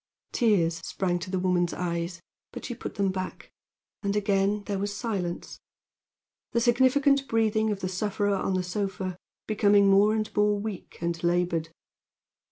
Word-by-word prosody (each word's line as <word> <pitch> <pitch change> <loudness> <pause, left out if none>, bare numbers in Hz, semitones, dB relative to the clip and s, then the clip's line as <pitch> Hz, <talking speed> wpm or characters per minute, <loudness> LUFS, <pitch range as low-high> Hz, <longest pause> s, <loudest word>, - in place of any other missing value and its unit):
Tears 180 -8 +2
sprang 180 -2 -1
to 180 +2 -7
the 190 - -1
woman's 180 -1 +1
eyes, 170 -1 -3 0.3
but - - -7
she 245 - -4
put 235 - -7
them 195 -1 +1
back; 185 0 -6 0.5
and 200 0 -1
again 200 0 +1
there 200 -1 -3
was 205 +1 -3
silence, 190 -7 -4 0.9
the 235 - +3
significant 265 +3 +3
breathing 220 -1 +2
of 205 -2 -2
the 185 - -1
sufferer 205 +2 0
on 195 -1 0
the 185 - 0
sofa 190 0 -3 0.3
becoming 205 -2 +4
more 205 +2 +5
and 215 -1 -3
more 210 0 +3
weak 210 -2 -6
and 170 0 -2
labored. 170 -2 +1
200 Hz, 155 wpm, -27 LUFS, 180-215 Hz, 0.9 s, more